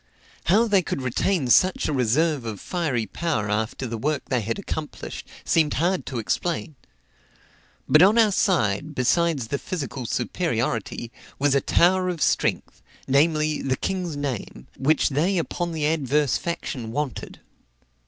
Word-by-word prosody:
How 215 +7 +4
they 200 -3 +4
could 140 -5 -4
retain 135 +4 0
such 185 +7 +4
a 155 - -1
reserve 140 +3 +1
of 110 -4 -5
fiery 145 -11 -1
power 110 - -2
after 110 +5 -2
the 115 -2 -4
work 150 +3 -1
they 125 -3 +1
had 110 +2 -3
accomplished, 155 -6 -6 0.2
seemed 155 -3 +2
hard 180 +4 0
to 130 - -4
explain. 160 +8 -2 1.1
But 155 - +6
on 200 +5 +6
our 220 -2 +5
side, 155 - +1
besides 140 -1 +1
the 140 - -1
physical 135 -8 -5
superiority, 120 - -2 0.3
was 145 0 +2
a 140 - +3
tower 185 +5 +3
of 175 -2 -3
strength, - - 0 0.3
namely, 155 +2 +2
the 130 -1 -1
king's 180 -5 -3
name, 130 - -5
"which 150 +3 +2
they 165 +8 +1
upon 170 +1 -2
the 155 -2 -2
adverse 150 -2 +1
faction 130 -9 -4
wanted." 145 -2 -4
150 Hz, 145 wpm, -24 LUFS, 125-170 Hz, 1.1 s, But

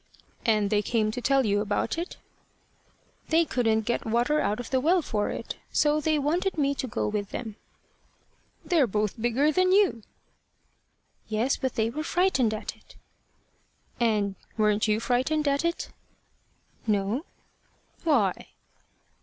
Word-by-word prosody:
"And 210 -3 +2
they 210 -1 +3
came 215 -1 0
to 250 - -5
tell 270 0 +3
you 205 -1 +2
about 210 +2 -1
it?" 340 +3 -5 1.1
"They 330 +1 +4
couldn't 225 -6 +1
get 235 +2 -1
water 240 +7 +1
out 210 -4 0
of 245 - -7
the 260 - +3
well 335 +5 +3
for 210 -5 -1
it. - - -5
So 300 0 +2
they 310 0 +1
wanted 335 +6 0
me 280 -2 +2
to 265 -1 -4
go 220 - -2
with 205 -1 -2
them." 220 -4 -6 1.1
"They're 325 -8 +3
both 210 +1 -2
bigger 250 +6 +2
than 370 +3 +2
you." 380 - +3 1.3
"Yes, 225 +5 +1
but 260 -2 -3
they 225 0 +1
were 300 +5 -4
frightened 330 - +2
at 215 - -5
it." - - -21 1.0
"And 210 -4 +1 0.2
weren't 210 0 +2
you 215 0 +2
frightened 260 +6 0
at 280 +2 +1
it?" 340 0 -2 1.0
"No." 210 - 0 0.8
"Why?" 240 - +1
245 Hz, 145 wpm, -27 LUFS, 215-305 Hz, 1.3 s, They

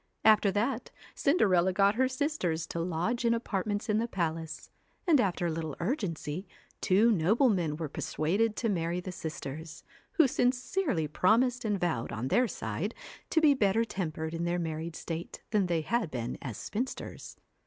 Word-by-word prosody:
After 215 -2 +6
that 230 +4 -1 0.2
Cinderella 190 - +3
got 195 +2 +4
her 260 +4 +2
sisters 255 - -1
to 170 - -5
lodge 180 +9 -1
in 235 0 +3
apartments 205 -2 -2
in 210 -1 +2
the 230 - 0
palace, 165 -5 -3 0.4
and 300 -7 +6
after 180 -4 0
a 170 - +1
little 160 -2 -4
urgency, 180 - -2 0.3
two 210 +5 +4
noblemen 185 - +2
were 160 -1 -3
persuaded 195 +10 0
to 235 - -1
marry 175 -3 0
the 185 +1 -6
sisters, 160 -1 -6 0.3
who 330 -7 +5
sincerely 250 - 0
promised 230 - +2
and 205 -2 0
vowed 170 -10 -1
on 120 +4 -3
their 250 - +3
side - - -4 0.3
to 320 - +3
be 300 -2 +6
better 225 -2 +2
tempered 160 -6 -3
in 165 0 -2
their 175 +1 0
married 160 -1 -3
state 165 +1 -6
than 205 -4 +2
they 170 -2 +1
had 225 +3 0
been 120 -3 -3
as 125 -7 -5
spinsters. 245 +5 -5
190 Hz, 165 wpm, -30 LUFS, 165-230 Hz, 0.4 s, After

